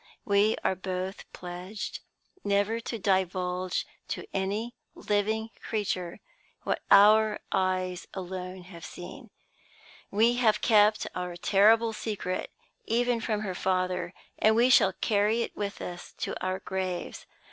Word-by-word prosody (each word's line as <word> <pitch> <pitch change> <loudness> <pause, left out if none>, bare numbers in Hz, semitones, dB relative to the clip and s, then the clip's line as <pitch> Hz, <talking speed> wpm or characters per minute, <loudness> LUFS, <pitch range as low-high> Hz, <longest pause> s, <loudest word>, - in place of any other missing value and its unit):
We 205 +1 +3
are - - +2
both 185 +1 -5
pledged 180 +3 -6 0.4
never 205 +3 +1
to 230 0 -5
divulge 185 -2 0 0.2
to - - -4
any 205 +5 -2 0.2
living 220 +2 -1
creature 185 -5 -3 0.4
what - - -1
our 215 +1 +6
eyes 185 -1 0
alone 185 0 -6
have 175 -2 -12
seen. 225 +7 -9 0.8
We 230 +4 +3
have 215 -4 +3
kept 210 -1 +4
our 180 -1 -4
terrible 220 +5 +4
secret 205 -4 -3 0.4
even 240 0 +1
from 215 -1 -1
her 195 -3 -3
father; 185 -1 -1 0.2
and 220 +1 +4
we 240 +3 +5
shall 190 -6 +6
carry 215 +4 +1
it - - -7
with 200 -1 -4
us 175 0 -7
to - - -4
our 185 0 0
graves. 185 -2 -4
200 Hz, 125 wpm, -28 LUFS, 185-220 Hz, 0.8 s, our